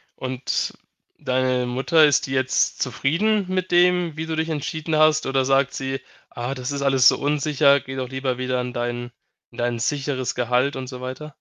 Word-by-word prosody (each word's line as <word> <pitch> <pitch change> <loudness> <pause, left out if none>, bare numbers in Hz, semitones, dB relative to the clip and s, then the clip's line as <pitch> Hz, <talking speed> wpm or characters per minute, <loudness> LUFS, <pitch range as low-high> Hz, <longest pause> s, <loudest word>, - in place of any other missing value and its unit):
und 130 0 -3 0.5
deine 130 -1 0
Mutter, 135 +6 +3
ist 145 -1 +2
die - - -7
jetzt 130 -1 0
zufrieden 185 - +1
mit 185 0 -2
dem, 175 -2 +3
wie 160 - -3
du 160 0 -3
dich 160 +1 -1
entschieden 155 +1 -3
hast 155 0 +4
oder 135 -1 +1
sagt 135 0 +2
sie: 135 0 -4 0.3
„Ah, 120 +2 -4
das 130 +1 -4
ist 140 -1 -3
alles 135 -2 +4
so - - +5
unsicher, 145 -1 +3
geh 135 0 -8
doch 130 -1 -4
lieber 130 -1 -2
wieder 130 0 -1
in 125 0 -5
dein 120 0 -3 0.4
in 120 - -17
dein 120 0 -1
sicheres 135 0 -2
Gehalt“, 125 +3 +1
und 130 -1 -5
so 125 -1 -8
weiter? 130 +4 -7
135 Hz, 190 wpm, -22 LUFS, 130-155 Hz, 0.5 s, so